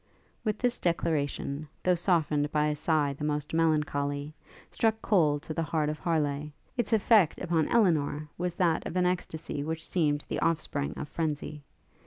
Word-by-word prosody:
While 215 -3 0
this 245 -1 0
declaration, 155 -3 -1 0.2
though 180 - +4
softened 160 -5 +1
by 150 0 +2
a 150 - -1
sigh 150 -2 +1
the 140 - -8
most 150 0 -2
melancholy, 150 -2 0 0.4
struck 220 -1 +1
cold 150 -7 +3
to 160 - -5
the 165 - -1
heart 155 -1 0
of 155 - -4
Harleigh, 150 -3 0 0.3
its 240 -2 -1
effect 215 -5 +4
upon 170 -3 +1
Elinor 155 -9 +2
was 180 0 -2
that 170 -3 +1
of - - -6
an 180 -1 +2
extacy 160 -5 -2
which 160 +1 -3
seemed 150 -4 +1
the - - -2
offspring 155 -3 -1
of - - -4
frenzy. 150 -1 -3
155 Hz, 165 wpm, -29 LUFS, 150-175 Hz, 0.4 s, though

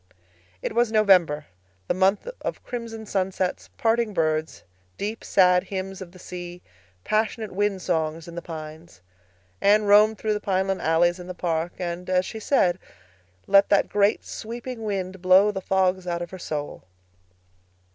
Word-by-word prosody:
It - - -2
was 235 0 +2
November—the 150 - +1
month 190 - +2
of - - -5
crimson 230 -2 -6
sunsets, 190 -2 -2
parting 225 -2 +1
birds, 155 -1 -1 0.3
deep, 215 +2 -4
sad 180 -1 +4
hymns 195 0 -5
of 180 -2 -8
the 185 - -15
sea, 175 -1 -8 0.4
passionate 215 0 -1
wind 195 -1 -1
songs 160 -1 -1
in 170 - -9
the 170 - -5
pines. 160 - -9 0.6
Anne 210 +2 +5
roamed 210 +2 +5
through 215 +1 -1
the 210 - -2
pineland 190 -1 0
alleys 175 +2 +2
in 180 - -9
the 185 - -6
park 170 -1 -2
and, 180 0 -5
as 185 0 +2
she 220 - -6
said, 185 -7 +2 0.7
let 200 0 +5
that 200 - +3
great 205 +1 +2
sweeping 235 +1 -7
wind 190 -3 -3
blow 190 +3 +5
the 195 -2 -5
fogs 185 -1 +1
out 170 0 -2
of 175 - -9
her 185 - -8
soul. 150 -3 -5
185 Hz, 155 wpm, -24 LUFS, 175-205 Hz, 0.7 s, Anne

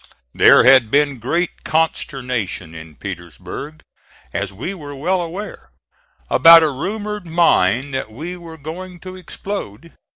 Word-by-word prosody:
There - - +6
had 130 -3 +6
been 140 0 +1
great 170 +10 -2
consternation 125 - -2
in 80 -1 -11
Petersburg, 90 - -8 0.5
as 100 0 -2
we 125 - -5
were 145 -6 -9
well 180 +7 0
aware, 180 +5 -7 0.6
about 165 0 +8
a 155 - +1
rumored 205 +6 -5
mine 140 - +2
that 130 -4 -4
we 160 +10 -7
were 170 -2 -11
going 175 +4 -8
to 185 0 -9
explode. 175 - -7
155 Hz, 130 wpm, -19 LUFS, 120-175 Hz, 0.6 s, about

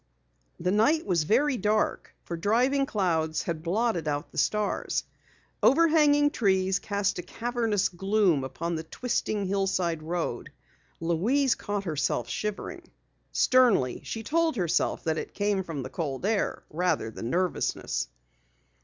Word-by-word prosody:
The 180 +2 0
night 290 +11 +3
was 170 -5 +1
very 255 - +2
dark 215 0 0
for 170 - -5
driving 250 +10 +2
clouds 160 - 0
had 165 -2 -3
blotted 180 -1 0
out 145 +1 -2
the - - -13
stars. 210 -1 0 0.6
Overhanging 295 -1 +5
trees 190 -5 +2
cast 200 -2 -1
a - - -1
cavernous 225 +1 -1
gloom 190 -4 +1
upon 160 +6 -4
the 160 -1 -3
twisting 215 +1 -2
hillside 185 -4 0
road. 170 +2 -3 0.5
Louise 220 - +2
caught 205 -1 -3
herself 145 - -1
shivering. 210 +6 -4 0.5
Sternly 240 - +3
she 225 - -5
told 325 +5 +1
herself 175 -7 0
that 160 -1 0
it - - -7
came 205 -1 0
from 160 -6 -5
the - - -6
cold 145 -2 -3
air 210 -1 0
rather 160 -8 0
than 115 +1 -5
nervousness. 180 +3 -1
195 Hz, 135 wpm, -27 LUFS, 165-230 Hz, 0.6 s, Overhanging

